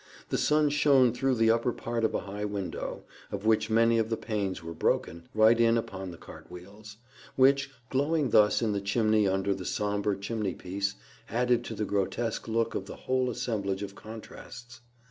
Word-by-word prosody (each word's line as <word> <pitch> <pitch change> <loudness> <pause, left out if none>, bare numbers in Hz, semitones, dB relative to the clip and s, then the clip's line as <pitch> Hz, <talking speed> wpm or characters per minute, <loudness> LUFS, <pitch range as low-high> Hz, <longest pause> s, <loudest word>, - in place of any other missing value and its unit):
The - - 0
sun 150 0 +3
shone 140 -5 +4
through 130 +1 +1
the 115 -1 +4
upper 115 +2 +1
part 115 0 -3
of 110 - +1
a - - 0
high 100 +1 -6
window, 100 -3 -4 0.3
of 100 +1 -5
which 110 0 +2
many 115 +1 +4
of 110 0 0
the 115 - -1
panes 100 -6 -3
were 85 0 -6
broken, 85 +1 -1
right 110 +2 +5
in 115 0 +4
upon 95 -4 -4
the 85 - -9
cart - - -13
wheels, 105 +4 -12 0.4
which, 140 +1 +4 0.2
glowing 145 0 +1
thus 105 +2 +4
in 110 - +1
the 100 -1 -1
chimney 110 +1 +2
under 95 +1 +1
the 95 -1 -6
sombre 105 +1 -1
chimney 105 -1 -3
piece, 100 +2 -3 0.3
added 120 0 +1
to 115 - -5
the 105 - -2
grotesque 105 +4 -2
look 115 0 0
of 95 - -4
the - - -8
whole 130 -1 0
assemblage 105 -5 -2
of 100 -1 -6
contrasts. 115 +3 -11
110 Hz, 185 wpm, -29 LUFS, 100-120 Hz, 0.4 s, right